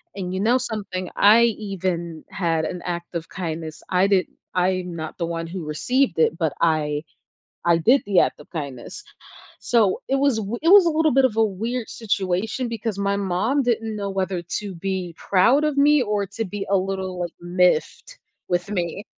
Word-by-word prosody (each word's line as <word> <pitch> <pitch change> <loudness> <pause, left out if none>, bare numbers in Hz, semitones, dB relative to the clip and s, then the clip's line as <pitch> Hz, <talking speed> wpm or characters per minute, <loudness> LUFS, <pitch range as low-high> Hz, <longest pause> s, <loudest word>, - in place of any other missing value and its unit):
and, 185 -2 -4
you 190 - -2
know 230 +5 +3
something, 200 -7 -4
I 215 +3 +7
even 185 -7 -2
had 165 -3 0
an 180 +1 -5
act 175 -1 -4
of 165 -1 -4
kindness; 160 -3 -5
I 185 +1 +3
did 195 -2 +2 0.3
I'm 180 -1 0
not 160 -1 -6
the 170 - -1
one 165 0 -4
who 175 -1 -6
received 245 - 0
it, 160 +1 +3
but 160 -4 0
I 150 -2 +1 0.6
I 170 -1 +4
did 245 - +4
the 200 -2 +3
act - - +1
of 150 - -15
kindness. 145 - -6 0.6
So, 225 -6 +2
it 270 - +2
was 275 -4 +2
wi 220 +2 -3
it 330 - +2
was 395 -1 +8
a - - +4
little 315 -1 +2
bit 270 0 +5
of 225 -4 -1
a 225 - +5
weird 225 +4 -3
situation 205 +3 -1
because 225 -3 -4
my 200 0 +1
mom 200 +8 0
didn't 225 -2 -1
know 200 -1 -3
whether 190 -2 -2
to 195 +2 -5
be 185 -1 -4
proud 235 +10 +3
of 300 -2 0
me 290 0 +5
or 210 -3 0
to 225 +4 -4
be 200 0 -5
a 200 - +4
little, 190 -1 -3
like, 175 -1 -4
miffed 180 - 0 0.3
with 175 +1 -1
me. 185 0 -3
195 Hz, 190 wpm, -23 LUFS, 175-225 Hz, 0.6 s, was